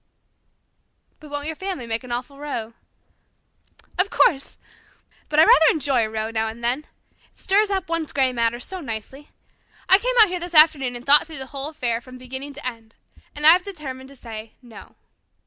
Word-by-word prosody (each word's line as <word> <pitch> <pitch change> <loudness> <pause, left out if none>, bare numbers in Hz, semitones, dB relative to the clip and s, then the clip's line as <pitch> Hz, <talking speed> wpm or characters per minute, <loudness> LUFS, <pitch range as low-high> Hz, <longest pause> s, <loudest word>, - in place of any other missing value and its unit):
'" - - -47
"But 305 - -13
won't 290 0 -4
your 320 +1 -3
family 375 -8 -5
make 230 +1 -3
an 250 - -10
awful 250 +4 -5
row?" 245 -6 -5 1.3
"Of 380 +2 +3
course. 275 -9 +1 0.7
But 300 - -2
I - - +9
rather 320 -1 +6
enjoy 275 -6 +1
a 220 - -2
row 220 0 -3
now 225 0 -1
and 225 +2 -8
then. 255 +6 -1 0.4
It - - -34
stirs 405 +2 +2
up 385 -3 -2
one's 330 -2 -2
grey 265 -2 +1
matter 235 0 0
so 375 +9 -6
nicely. 265 +3 -7 0.6
I 380 - +7
came - - -1
out 430 -3 +8
here 360 0 -3
this 350 0 -7
afternoon 300 -5 +5
and 240 +1 -8
thought 290 +3 +5
the 290 -5 -6
whole 275 +2 -6
affair 250 -7 -2
over - - -9
from 255 +1 -12
beginning 265 +3 -7
to 290 0 -10
end. 230 -3 -7 0.4
And 295 +1 -2
I 315 - +10
have 360 +2 +4
determined 275 -9 -8
to 275 - -15
say 225 -3 -10
'no.'" 235 -2 -14
275 Hz, 200 wpm, -22 LUFS, 240-315 Hz, 1.3 s, I